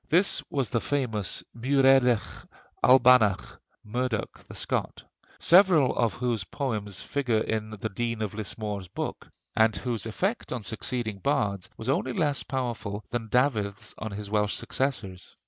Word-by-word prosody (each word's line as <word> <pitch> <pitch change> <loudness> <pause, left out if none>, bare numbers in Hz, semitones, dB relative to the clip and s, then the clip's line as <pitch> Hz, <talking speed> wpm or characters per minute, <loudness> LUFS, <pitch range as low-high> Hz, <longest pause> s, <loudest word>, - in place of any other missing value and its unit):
This 180 +5 +4
was 135 -4 -1
the 115 -3 +1
famous 115 -9 -1
Muireadach 130 -2 +3 0.4
Albannach 125 -6 +5 0.2
(Murdoch 120 0 -2
the - - -10
Scot), - - -2 0.4
several 175 -6 +5
of 115 -3 +1
whose 120 -5 -1
poems 105 -4 -4
figure 125 -6 0
in 110 -1 -2
the 110 0 -4
Dean 115 +1 -2
of 105 - -4
Lismore's 105 -2 -4
book, - - -5 0.3
and 110 -1 +4
whose 115 0 -3
effect 195 - -2
on 125 -4 -3
succeeding 110 -1 -3
bards 100 -6 0
was 110 - -7
only 135 - 0
less 150 -8 +1
powerful 115 -6 -4
than 115 -2 -3
Dafydd's 105 -6 0
on 110 - -4
his 105 0 -6
Welsh 105 0 +1
successors. 110 -9 -3
115 Hz, 140 wpm, -27 LUFS, 105-130 Hz, 0.4 s, Albannach